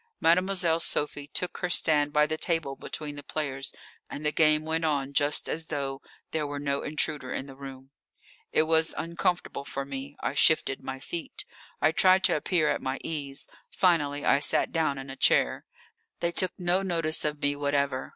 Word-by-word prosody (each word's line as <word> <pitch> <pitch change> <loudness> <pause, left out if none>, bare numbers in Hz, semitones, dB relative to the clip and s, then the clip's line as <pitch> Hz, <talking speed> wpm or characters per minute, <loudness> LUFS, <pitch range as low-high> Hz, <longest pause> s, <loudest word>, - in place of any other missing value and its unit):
Mademoiselle 175 -1 +3
Sophie 145 -2 -1
took 180 +5 -2
her 180 - -1
stand 150 -4 +2
by 150 0 +4
the 155 +1 -2
table 155 -4 -1
between 150 0 -6
the 145 - -7
players, 135 -2 -3 0.4
and 150 - -7
the 150 - +2
game 155 -1 +3
went 160 +1 -1
on 140 -3 0
just 145 +1 +3
as 160 +1 -3
though 135 -2 -3 0.3
there 155 -2 -1
were 145 0 -4
no 140 -1 -1
intruder 150 -3 -2
in 135 - -3
the 135 -1 -11
room. 135 -1 -10 0.6
It - - +4
was 160 0 +2
uncomfortable 170 -2 -1
for 140 0 -4
me. 135 +1 -7
I - - -2
shifted 145 -1 +3
my 130 0 -6
feet. 165 +5 -5 0.4
I 155 - +5
tried 185 +3 +4
to - - +4
appear 155 +1 +1
at - - 0
my 130 +1 -2
ease; 140 -3 -3 0.2
finally 145 -6 +1
I 140 - +5
sat 145 - +3
down 155 -4 0
in 135 0 -7
a - - -7
chair. - - +3 0.5
They 170 - 0
took 185 +1 0
no 180 +1 +1
notice 165 -4 0
of 150 -1 -2
me 145 0 0
whatever. 140 -2 -1
150 Hz, 185 wpm, -28 LUFS, 140-165 Hz, 0.6 s, I